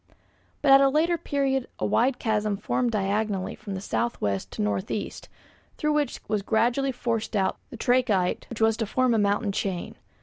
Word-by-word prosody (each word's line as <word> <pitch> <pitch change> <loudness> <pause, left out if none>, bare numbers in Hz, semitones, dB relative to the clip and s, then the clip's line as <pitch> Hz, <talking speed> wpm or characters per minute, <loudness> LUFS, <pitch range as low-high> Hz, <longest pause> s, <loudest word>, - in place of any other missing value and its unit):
But 280 - +5
at 270 0 +9
a 275 - +5
later 320 +5 +2
period 275 -5 -1
a - - -2
wide 250 +2 +2
chasm 215 -3 0
formed 245 +4 0
diagonally 205 -2 -1
from 195 -2 -6
south 235 +4 -2
west 100 -2 -2
to - - -3
north 100 -2 -1
east, 210 - -5 0.5
through 300 0 +1
which 295 -1 0
was 215 -1 0
gradually 240 +6 +1
forced 230 -3 -2
out 190 -2 0
the 250 - -9
trachyte 230 -7 +1
which 230 -2 -7
was 220 0 +3
to 225 -2 -2
form 255 +3 +2
a 225 - +2
mountain 205 +1 +1
chain. 190 -3 -3
225 Hz, 180 wpm, -26 LUFS, 200-255 Hz, 0.5 s, at